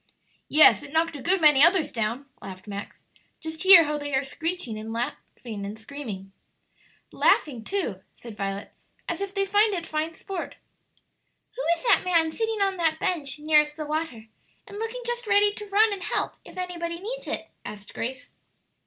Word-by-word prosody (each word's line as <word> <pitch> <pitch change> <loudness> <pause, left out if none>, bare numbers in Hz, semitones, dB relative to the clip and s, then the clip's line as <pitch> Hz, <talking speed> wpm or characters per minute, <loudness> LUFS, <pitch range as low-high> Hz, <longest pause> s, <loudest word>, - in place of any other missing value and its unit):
"Yes; 305 0 +7
it 290 -1 -11
knocked 325 0 +1
a 280 - -7
good 370 +6 +2
many 295 -3 +7
others 340 -1 +4
down," 230 +4 -2 0.2
laughed 185 -1 -9
Max; 200 -1 -8 0.3
"just 320 0 -6
hear 375 -3 +10
how 300 -1 -2
they 290 -1 -2
are 265 - +2
screeching 325 -3 -3
and 220 -2 -5
screaming." 220 -6 -7 0.8
"But - - -15
laughing, 250 -7 +3
too," 240 - -2
said 230 -3 -11
Violet, 195 0 -4 0.3
"as - - -3
if 395 0 -4
they 395 0 +1
find 410 +1 +3
it 340 -2 -4
fine 315 +1 -2
sport." 380 -1 -6 1.0
"Who - - -4 0.2
is - - -12
that - - +5
man 335 -3 +2
sitting 445 +2 -1
on 390 -1 0
that 320 -2 +1
bench 295 -6 -2
nearest 300 0 +3
the 305 - -4
water, 300 -7 -3 0.4
and 410 0 -9
looking 455 +3 -4
just 480 -1 -2
ready 410 0 +4
to 420 0 -8
run 415 +2 +4
and 390 - -6
help - - -2
if - - -14
anybody 340 -2 -4
needs - - -6
it?" - - -4
asked 205 -1 -9
Grace. 255 +2 -5
320 Hz, 175 wpm, -26 LUFS, 255-390 Hz, 1.0 s, hear